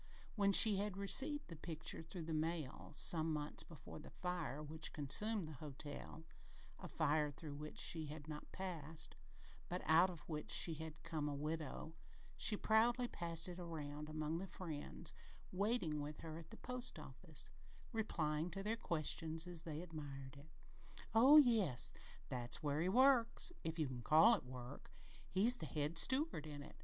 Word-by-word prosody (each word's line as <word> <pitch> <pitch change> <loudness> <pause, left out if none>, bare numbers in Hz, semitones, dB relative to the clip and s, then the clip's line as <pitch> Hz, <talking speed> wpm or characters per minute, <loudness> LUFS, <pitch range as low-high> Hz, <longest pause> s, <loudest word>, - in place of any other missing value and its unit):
When 200 -2 +3
she 205 +1 +10
had 200 -1 -2
received 285 +9 +3
the 165 - -8
picture 160 0 -3
through 165 +1 -7
the 160 0 -4
mail, 155 -3 -3
some 160 +1 +4
months 150 -1 -3
before 155 -1 -11
the 155 - -11
fire 175 -5 -4
which 155 +1 -3
consumed 195 +8 0
the 155 - -8
hotel 145 +1 -7 0.6
a - - -7
fire 150 -1 +1
through 145 +1 -7
which 150 +1 -8
she 160 -2 -1
had 150 0 -8
not 150 -1 -8
passed, 165 -5 -3 0.5
but 180 +1 -3
out 165 +4 +6
of 170 -4 -8
which 155 -2 -5
she 165 - +3
had 160 0 -8
come 155 -3 -2
a 145 - -3
widow 155 +1 -4 0.4
she 210 - +2
proudly 235 +4 +3
passed 170 -5 -2
it 180 0 -7
around 150 -3 -6
among 155 +1 -2
the 195 - -5
friends 165 -2 -4 0.4
waiting 185 -6 0
with 150 +1 -6
her 160 -1 -7
at 165 -1 -12
the - - -9
post 250 0 -4
office, - - -8 0.4
replying 165 -8 -1
to 195 +3 -5
their 220 +3 -1
questions 160 -3 0
as 175 -2 -3
they 160 -1 -5
admired 140 -5 -8
it: 140 +3 -14 0.6
"Oh, 260 +7 +8
yes! 220 - +4 0.3
That's 125 +4 -2
where 145 +1 0
he 180 - +1
works 250 - +4
if 160 +1 -3
you 155 -3 0
can 125 -2 -6
call 160 - +7
it 225 - -1
work. 125 +1 -9 0.4
He's 220 +7 +4
the 160 - -6
head 150 +2 0
steward 260 - +2
in 145 -1 -7
it. - - -13
160 Hz, 170 wpm, -40 LUFS, 150-190 Hz, 0.6 s, she